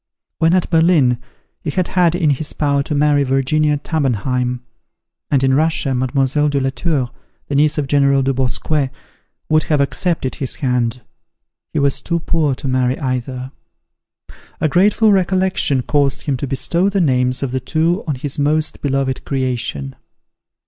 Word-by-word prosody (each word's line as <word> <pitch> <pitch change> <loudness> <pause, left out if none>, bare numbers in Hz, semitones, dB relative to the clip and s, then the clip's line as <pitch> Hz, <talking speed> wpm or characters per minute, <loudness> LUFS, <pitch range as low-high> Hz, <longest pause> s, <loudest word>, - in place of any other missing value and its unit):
When 165 +2 +3
at 185 - +1
Berlin, 160 -7 +3 0.4
he 155 - -3
had 180 +4 -1
had 175 -2 +2
it 180 - -3
in 150 - +4
his 145 +2 -3
power 140 -2 +1
to 150 +1 -3
marry 145 0 +3
Virginia 140 +3 +1
Tabenheim; 125 -4 -1 0.7
and 135 -2 +2
in 135 0 +3
Russia, 150 -1 +1
Mlle. 135 +3 +1
de 140 -1 0
la 135 0 0
Tour, 135 -2 -1 0.4
the - - -4
niece 150 +2 +3
of 150 - 0
General 140 -1 +3
Dubosquet, 135 +2 0 0.6
would 155 0 +3
have 150 -2 +1
accepted 140 0 -1
his 135 - -3
hand. 125 -4 -1 0.7
He - - -4
was 140 -1 +1
too 170 -1 -1
poor 155 -4 0
to 140 - -6
marry 130 0 +1
either. 130 -1 -3 1.1
A - - +2
grateful 210 +7 +3
recollection 185 -8 +1
caused 140 -1 0
him 140 -3 -1
to 140 - -4
bestow 170 +8 0
the 200 0 0
names 125 -5 +1
of 135 - -2
the 130 - -1
two 165 - 0
on 150 - -1
his 140 +2 -5
most 150 +2 0
beloved 135 -2 -1
creation. 120 - -2
140 Hz, 160 wpm, -18 LUFS, 130-155 Hz, 1.1 s, in